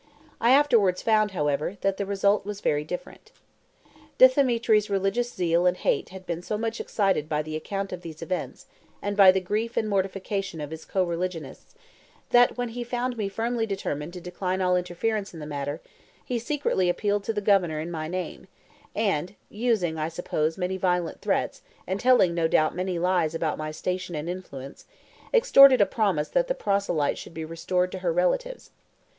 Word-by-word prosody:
I 235 - +3
afterwards 235 -10 +4
found, 215 -2 +3
however, 150 +1 -1
that 195 0 0
the 200 - -3
result 200 +1 +2
was 205 0 -6
very 150 -6 0
different. 180 +4 -8 0.9
Dthemetri's 235 -5 +4
religious 200 +5 0
zeal 175 -2 +1
and 180 0 +2
hate 465 -5 0
had 190 0 -11
been 170 -1 -3
so 210 +4 -3
much 225 +1 -3
excited 195 -7 0
by 150 0 0
the 155 0 -6
account 195 +4 -4
of 180 - -6
these 165 -2 -8
events, 180 +2 -4 0.3
and 205 0 -3
by 195 -2 +8
the 190 - +1
grief 215 +5 -3
and 220 - +1
mortification 195 -2 -2
of 150 0 -6
his 160 0 -8
co 190 - 0
religionists, 170 -3 -5 0.6
that 245 0 +5
when 245 -1 -2
he 240 +1 -5
found 245 +1 -2
me 210 -4 -2
firmly 225 +2 -1
determined 170 -6 -3
to 180 - -8
decline 180 +1 -3
all 180 -1 +2
interference 180 +3 -2
in - - -8
the 150 - -6
matter, 145 -1 -4 0.4
he 245 -2 -2
secretly 230 -8 0
appealed 205 +2 0
to - - 0
the 215 - -2
Governor 190 -6 +2
in 165 +3 -5
my 155 -2 -4
name, 180 +2 -5 0.5
and 195 -4 -1
(using, 210 -8 0
I 155 +1 -1
suppose, 160 -2 -2
many 185 0 -2
violent 180 -2 -1
threats, - - -1 0.2
and 190 +1 -2
telling 245 -8 +4
no 165 -1 +1
doubt 155 -1 +2
many 185 0 -2
lies 170 -2 +1
about 160 -2 -1
my 155 0 -3
station 180 +2 -4
and 150 +2 -4
influence) 145 -7 -7 0.5
extorted 275 - +7
a 200 - +6
promise 190 -7 0
that - - +1
the - - -1
proselyte 195 - 0
should - - -11
be 160 0 -4
restored 180 +3 -1
to - - -5
her - - 0
relatives. - - -1
190 Hz, 185 wpm, -26 LUFS, 170-220 Hz, 0.9 s, by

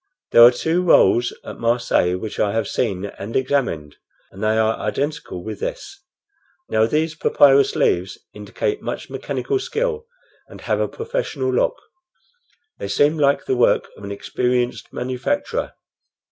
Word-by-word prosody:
There 115 - +7
are 120 - +11
two 160 +8 0
rolls 120 -8 +4
at - - -8
Marseilles 115 -6 +1
which 110 +2 -6
I 100 -1 +1
have 115 - -1
seen 100 -6 -2
and 100 +2 -8
examined, 130 - -1 0.3
and 95 - -9
they 110 +1 +2
are 110 0 +2
identical 135 - -3
with 110 -2 -6
this. - - -6 0.7
Now 110 0 +2
these 155 +5 0
papyrus 140 -3 +4
leaves 90 +1 +1 0.2
indicate 105 - -3
much - - -6
mechanical 405 -1 -2
skill, 465 +1 -2 0.4
and - - -13
have - - -1
a - - +1
professional 455 -4 -3
look. - - +1 1.0
They - - -4
seem 145 +10 +2
like 140 -1 +2
the 130 - 0
work 120 - +2
of - - -14
an 100 - -6
experienced 125 +4 -2
manufacturer." 285 - -2
125 Hz, 145 wpm, -21 LUFS, 105-165 Hz, 1.0 s, are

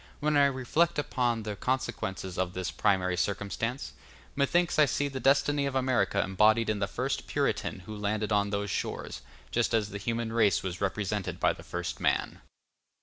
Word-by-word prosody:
When 150 +1 +1
I 140 -1 +6
reflect 140 +6 +1
upon 125 -6 0
the 105 -1 -4
consequences 95 -7 -3
of 90 -1 -1
this 95 -1 -2
primary 95 -3 +1
circumstance, 100 +6 -2 0.4
methinks 170 +5 +2
I 150 - +8
see 145 +2 0
the 135 -1 -5
destiny 140 +1 +3
of 135 - -4
America 130 -6 +2
embodied 110 +4 +3
in 105 - -2
the 100 - 0
first - - -3
Puritan - - -1
who 105 +4 -8
landed 105 0 -2
on 100 0 +2
those 100 -1 -2
shores, - - -4 0.3
just - - +1
as 105 -2 +1
the 100 0 -6
human 115 +1 -2
race 110 -4 +3
was 90 -2 -4
represented 100 0 -2
by - - +3
the - - -12
first 90 0 -5
man. - - 0
110 Hz, 175 wpm, -29 LUFS, 100-130 Hz, 0.4 s, I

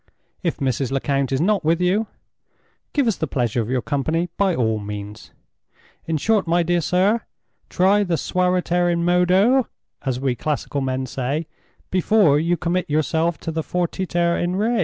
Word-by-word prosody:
If 170 -4 -1
Mrs. 135 -2 -1
Lecount 135 0 0
is 135 - +1
not 195 +3 +1
with 165 +2 +2
you, 190 +5 +1 0.8
give 285 -3 +1
us 225 -4 +1
the 160 - -2
pleasure 120 -3 0
of 110 - -5
your 125 -1 0
company 160 +4 -1
by 195 -3 +1
all 110 -3 0
means. 105 +1 -7 0.8
In 160 -1 0
short, 210 +4 +1
my 170 +1 +2
dear 175 0 +1
sir, 190 +8 +2 0.5
try 195 +3 +3
the 175 -4 0
suaviter 180 0 +1
in 170 0 0
modo 185 +9 +3 0.4
(as 130 -2 -1
we 135 -1 0
classical 145 +2 -3
men 130 0 -2
say) 135 +5 -3 0.5
before 185 -5 +4
you 170 +2 +1
commit 175 +2 -1
yourself 160 +3 +1
to 165 - -4
the 160 0 -2
_fortiter 175 0 -1
in 175 +1 -1
re!" 220 +4 +1
170 Hz, 165 wpm, -21 LUFS, 140-180 Hz, 0.8 s, before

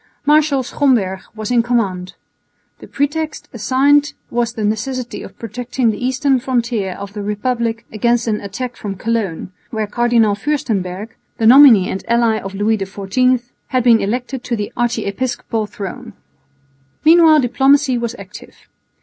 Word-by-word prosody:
Marshal 295 -2 +3
Schomberg 235 -9 +1 0.2
was 215 +1 -5
in 240 -1 +4
command. 200 -7 -1 0.7
The - - -12
pretext 305 +2 -2
assigned 275 +6 +2 0.2
was 235 -1 -1
the 225 -3 -4
necessity 235 +4 -3
of - - -11
protecting 240 +1 -2
the 215 - -6
eastern 260 +1 +1
frontier 235 -6 -1
of 200 +2 -9
the 205 - -5
Republic 230 +2 -2
against 235 +2 +1
an 215 -2 -1
attack 235 +5 -5
from 200 -3 -6
Cologne, 200 -5 -3 0.2
where 220 -2 -2
Cardinal 230 -1 +2
Fürstenberg, 205 -5 -2 0.3
the 225 - 0
nominee 240 -6 +8
and 190 - -5
ally 230 -2 +2
of 195 -1 -8
Louis 215 +2 +1
XIV, 205 +6 0 0.2
had 255 -2 0
been 235 -2 +5
elected 245 +4 -3
to 240 - -1
the 205 -2 -5
archiepiscopal 235 -1 -2
throne. 220 +4 -8 0.9
Meanwhile 320 -2 +6
diplomacy 270 +1 +2
was 235 0 -3
active. - - -12
235 Hz, 140 wpm, -17 LUFS, 210-255 Hz, 0.9 s, nominee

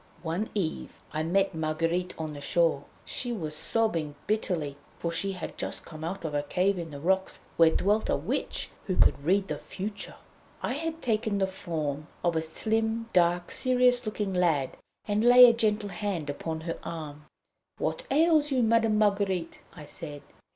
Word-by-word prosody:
One 175 +6 -2
eve 175 -6 -2 0.2
I 155 - -1
met 195 +5 +1
Marguerite 165 +3 -1
on 155 -1 -4
the 145 - -8
shore. 165 -3 +2 0.2
She 245 - -2
was 160 -9 -3
sobbing 165 -6 0
bitterly, 175 -9 -1 0.2
for 170 - -2
she 195 +4 0
had 180 - -7
just - - -4
come 155 -1 -9
out 170 +1 -4
of 155 - -3
a 145 - +1
cave 180 +6 +1
in 165 -1 -5
the 145 -2 -8
rocks, 190 +5 0 0.2
where 165 -1 +6
dwelt 205 +6 +1
a - - +3
Witch - - -2 0.2
who 185 - 0
could - - +4
read 195 +5 +2
the - - -3
future. 205 +1 -6 0.5
I - - 0
had 325 +3 -4
taken 220 -3 0
the 195 - +2
form 155 -6 -4 0.2
of 170 -1 +2
a 160 - +2
slim, 220 +7 -1
dark, 175 0 +3
serious 250 -1 +3
looking 210 -2 -2
lad, 165 -7 +1 0.3
and 210 +1 +1
laying 245 0 +9
a - - -2
gentle 215 -2 +1
hand 190 -8 -3
upon 160 +2 -4
her 165 0 -4
arm, 150 -3 -7 0.5
'What - - -2
ails 310 -1 +4
you, 255 -3 +3
Madame 225 -1 +3
Marguerite?' 200 -5 +1
I 150 - -9
said. 145 -1 -8
185 Hz, 175 wpm, -28 LUFS, 160-215 Hz, 0.5 s, laying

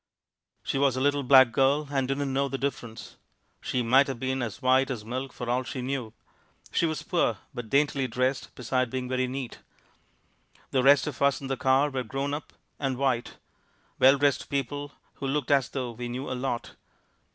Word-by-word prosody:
She 135 - -1
was 135 -2 +3
a - - -1
little 145 +1 +2
black 130 -2 +7
girl 140 +5 +2
and 135 -2 0
didn't 135 0 -1
know 140 +1 +1
the 135 - -3
difference 120 -5 -5 0.4
she 125 - -1
might 130 +5 +5
have 135 -4 -4
been 130 +1 -1
as 115 -4 -4
white 130 0 +3
as 115 -5 -4
milk 130 +3 -4
for 120 - -7
all 125 +2 +1
she 130 0 -5
knew. 130 -4 -3 0.6
She 170 - +2
was 155 -1 -3
poor 170 - +1 0.2
but 120 -3 -6
daintily 140 -1 +2
dressed 130 +3 -1
beside 130 0 -1
being 130 +1 -3
very 130 0 0
neat. 130 -1 -5 1.1
The 130 - +2
rest 140 +2 +6
of 150 -4 -6
us 140 -1 +3
in 140 - -8
the 135 0 -1
car 135 +3 +2
were 130 -1 -2
grown 135 +4 -3
up 145 0 -5 0.3
and 135 -3 -1
white 130 -3 -1 0.6
well 135 +2 +7
dressed 140 0 +1
people 145 +1 -3 0.3
who 135 - -4
looked 145 +1 -1
as 135 -3 +3
though 125 -3 -3
we 120 +1 -6
knew 130 +3 -4
a - - 0
lot. 125 -2 -3
135 Hz, 195 wpm, -27 LUFS, 125-140 Hz, 1.1 s, black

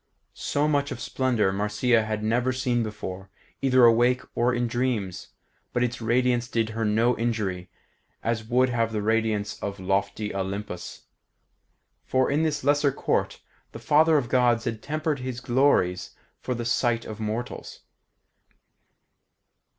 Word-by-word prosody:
So 145 +1 -1
much 145 -2 +1
of - - -5
splendour 130 -7 0
Marcia 105 +4 +1
had 110 0 -3
never 120 +4 +1
seen 125 -2 0
before, 95 -3 -6 0.3
either 130 -2 +5
awake 120 +2 +4
or 120 +1 +2
in 120 0 0
dreams, 115 -6 -2 0.5
but 120 - +1
its 120 0 -2
radiance 120 +1 +1
did 115 -2 -1
her 115 0 -3
no 110 +3 +2
injury, 105 -6 -2 0.5
as 115 -1 -1
would 125 +3 +2
have 115 -2 0
the 105 -1 -1
radiance 110 -1 0
of 100 -1 -4
lofty 100 +2 -1
Olympus; 95 -2 -5 1.0
for 130 0 +1
in 145 +2 +2
this 150 -3 -1
lesser 145 0 +3
court - - -1 0.3
the - - -6
Father 155 +6 +4
of 130 -5 -1
Gods 120 -2 +2
had 115 -3 -3
tempered 155 -1 -2
his 125 -1 -5
glories 120 -9 +1 0.2
for 125 - -3
the 120 0 -4
sight 115 0 +1
of 110 0 -7
mortals. 110 +3 -5
120 Hz, 145 wpm, -26 LUFS, 105-130 Hz, 1.0 s, either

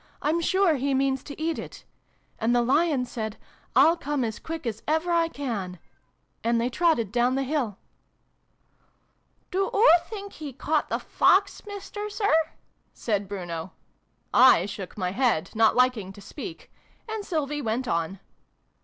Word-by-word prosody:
I'm 320 +3 0
sure 375 -2 +3
he 270 +1 0
means 270 0 +1
to 285 - -9
eat 320 +1 -1
it! - - -9 0.3
' - - -39
And 230 +2 +2
the 240 - +3
Lion 280 +1 +2
said 220 -3 -5 0.2
' - - -34
I'll 330 - +6
come 290 -4 -2
as 220 -2 -3
quick 325 -3 -6
as 225 -2 -3
ever 320 +3 +1
I 335 -1 +3
can!' 230 - -4 0.7
And 235 0 +2
they 240 +2 0
trotted 275 - +2
down 245 +2 +2
the 270 - 0
hill." 260 -8 -1 0.9
" - - -42
Do 390 +1 +1
oo 445 +4 +4 0.2
think 405 -2 -7
he 295 -3 -7
caught 300 +4 -1
the - - 0
Fox, 400 +1 +2
Mister 415 +1 -6
Sir? 410 -2 0 0.4
" - - -44
said 205 -3 0
Bruno. 175 -3 -5 0.6
I 245 -8 +7
shook 195 -1 -7
my 180 -2 -1
head, 235 -7 +1
not 220 0 +4
liking 250 -6 +2
to 205 - -13
speak: 320 - -9 0.4
and 440 -1 -4
Sylvie 295 -5 -2
went 240 +1 -2
on. 170 +2 -1
265 Hz, 165 wpm, -26 LUFS, 220-325 Hz, 0.9 s, I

